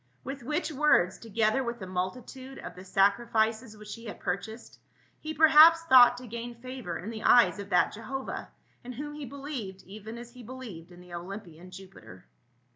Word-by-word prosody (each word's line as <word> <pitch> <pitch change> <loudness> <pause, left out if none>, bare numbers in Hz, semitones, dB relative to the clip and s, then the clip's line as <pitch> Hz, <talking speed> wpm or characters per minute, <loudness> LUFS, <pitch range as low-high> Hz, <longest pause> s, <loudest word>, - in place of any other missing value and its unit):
With 270 +1 -6
which 300 +7 -2
words, 280 - +3
together 225 +3 0
with 235 -1 -4
the 195 - -7
multitude 245 +9 -5
of - - -8
the 180 - -11
sacrifices 220 +3 +1
which 210 0 -9
he 230 0 -11
had 210 - -8
pur 180 - -1
chased, 220 +3 -12 0.4
he 310 - -6
perhaps 320 +1 +7
thought 250 -6 +7
to 250 - -9
gain 235 +1 -7
favor 250 -6 -6
in 205 +6 -7
the 220 -1 -7
eyes 240 -3 +5
of 200 0 -7
that 180 - +3
Jehovah, 260 +5 -6 0.3
in 250 +1 -7
whom 295 +4 -6
he 295 -1 -7
believed 265 -8 -7
even 215 +4 -9
as 240 0 -10
he 250 - -12
be 235 - -13
lieved 200 -11 -9
in 175 0 -14
the 180 -1 -14
Olympian 180 -1 -8
Jupiter. 180 - -13
230 Hz, 190 wpm, -28 LUFS, 195-260 Hz, 0.4 s, perhaps